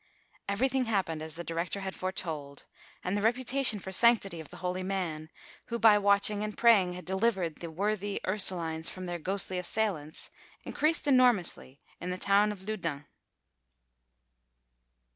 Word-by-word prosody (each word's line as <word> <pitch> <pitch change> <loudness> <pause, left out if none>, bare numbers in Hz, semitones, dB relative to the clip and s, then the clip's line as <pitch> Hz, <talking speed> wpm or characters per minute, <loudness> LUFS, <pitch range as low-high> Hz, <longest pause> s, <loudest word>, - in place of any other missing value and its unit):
Everything 255 +5 +1
happened 190 -8 -1
as 160 0 -7
the 170 - -5
director 170 +4 -3
had 190 -1 -4
foretold, 160 -7 -5 0.4
and 180 - -1
the 205 - 0
reputation 245 +1 +2
for 190 -1 -7
sanctity 200 -4 +4
of 160 - -9
the - - -11
holy 180 +1 -1
man, 175 -5 -3 0.4
who 235 - -2
by 225 -2 +7
watching 205 0 +3
and 215 0 -5
praying 205 -7 +5
had 180 0 -8
delivered 190 -4 0
the 170 - -6
worthy 200 +3 -1
Ursulines 170 -5 -2
from 185 0 -7
their 175 -1 -4
ghostly 190 +1 -2
assailants, 180 -5 -2 0.3
increased 310 +2 0
enormously 245 - +2 0.2
in 180 - -5
the 180 - -2
town 200 +2 +3
of 195 -1 -10
Loudun. 165 -9 -3
190 Hz, 145 wpm, -30 LUFS, 170-215 Hz, 0.4 s, by